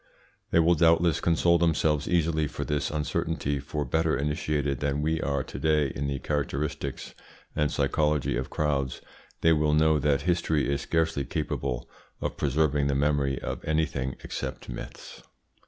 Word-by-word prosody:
They - - +2
will 85 +1 +5
doubtless 85 0 +4
console 85 +1 +3
themselves 80 -3 +2
easily 80 -3 +1
for - - -5
this 75 -1 -1
uncertainty, 75 -1 -1
for, 75 +2 -3
better 80 +3 +1
initiated 75 -1 -1
than 70 0 -1
we 80 +1 0
are 70 -2 0
to - - -8
day 75 -3 +2
in 70 0 -3
the 70 -1 -1
characteristics 70 -1 -3 0.4
and 75 -1 +1
psychology 75 0 +1
of - - -3
crowds, 70 -4 -1 0.4
they 80 - +5
will 75 -1 +2
know 80 0 +4
that 70 0 +2
history 85 -4 +1
is 70 - -2
scarcely 80 -2 0
capable 65 -1 -3 0.3
of - - -3
preserving 75 0 +1
the 70 - +1
memory 70 -1 +1
of - - -4
anything 75 -4 -1
except - - -5
myths. - - -8
75 Hz, 155 wpm, -27 LUFS, 70-80 Hz, 0.4 s, will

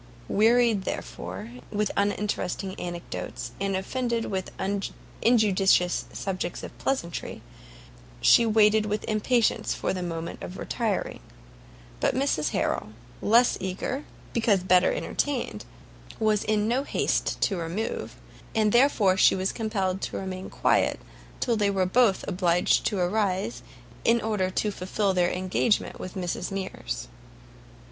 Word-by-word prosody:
Wearied, 230 0 +4
therefore, 90 - -5 0.2
with 210 0 -1
uninteresting 200 -2 -1
anecdotes, 175 -1 -5
and 195 -1 0
offended 235 +4 -1
with 190 -2 -3 0.7
injudicious 195 -6 +3
subjects 185 -2 -4
of - - -8
pleasantry, 170 - -3 0.8
she 235 - +6
waited 215 -1 +4
with 210 0 -2
impatience 220 +2 +1
for - - -1
the 185 - -3
moment 170 -1 -5
of 180 - -7
retiring; 220 -5 -2 0.8
but - - +1
Mrs 255 - +1
Harrel, 105 -2 -1 0.3
less 235 +4 +4
eager, 190 +9 -3 0.3
because 215 -5 +2
better 185 -1 +4
entertained, 285 - -2 0.5
was 215 -1 +2
in 215 0 +1
no 245 +4 +2
haste 280 - 0
to 195 - +1
remove, 175 +7 -3 0.4
and 215 -1 +3
therefore 235 -6 +4
she - - +6
was 190 0 0
compelled 195 -4 -2
to - - -3
remain 190 0 -5
quiet, - - +2 0.4
till 235 - +1
they 205 -2 +2
were 195 -2 +1
both 205 +1 +3
obliged 180 -1 +2
to 205 - -1
arise, 185 - 0 0.4
in 235 +1 +4
order 210 -4 0
to 210 +3 -1
fulfil 195 +1 -1
their 175 -1 +2
engagement 185 +4 0
with 185 - -7
Mrs 180 -1 -3
Mears. - - -4
200 Hz, 125 wpm, -26 LUFS, 185-220 Hz, 0.8 s, she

